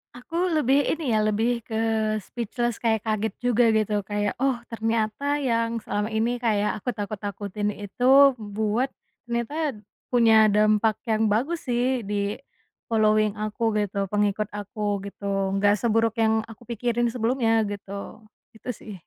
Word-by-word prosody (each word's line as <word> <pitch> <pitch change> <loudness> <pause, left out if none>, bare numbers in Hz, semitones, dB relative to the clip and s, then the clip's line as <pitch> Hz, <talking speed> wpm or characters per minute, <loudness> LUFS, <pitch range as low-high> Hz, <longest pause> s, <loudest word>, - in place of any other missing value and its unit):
Aku 250 +6 -10 0.2
lebih 285 -1 +3
ini 310 -6 -1
ya 215 - +3
lebih 220 +3 +1
ke 220 - -5 0.5
speechless 240 +1 -3
kayak 220 -2 +1
kaget 220 0 -1
juga 245 -1 +3
gitu 215 -1 +1
kayak 205 +1 -2
oh 270 0 +2 0.2
ternyata 225 +5 -1
yang 230 -3 0
selama 210 +1 -2
ini 230 +3 0
kayak 215 -3 0
aku 250 - -4
takut-takutin 205 0 -4
itu 255 +7 +5
buat, 215 +4 -1 0.4
ternyata, 250 +5 -2 0.3
punya 225 -3 +5
dampak 215 +1 +3
yang 220 -2 +1
bagus 265 +11 -1
sih 250 +1 +1
di, 205 0 -2 0.5
following 215 -2 +2
aku 215 +1 -1
gitu 200 0 -2
pengikut 210 +1 0
aku 205 -1 -3
gitu 200 0 -7 0.3
nggak 205 +1 +4
seburuk 225 +1 +1
yang 220 0 +3
aku 225 +1 -13
pikirin 240 +1 -1
sebelumnya 230 -1 +1
gitu, 200 +1 -7 0.3
itu 220 - -9
sih. 215 -2 -10
220 Hz, 140 wpm, -25 LUFS, 210-240 Hz, 0.5 s, itu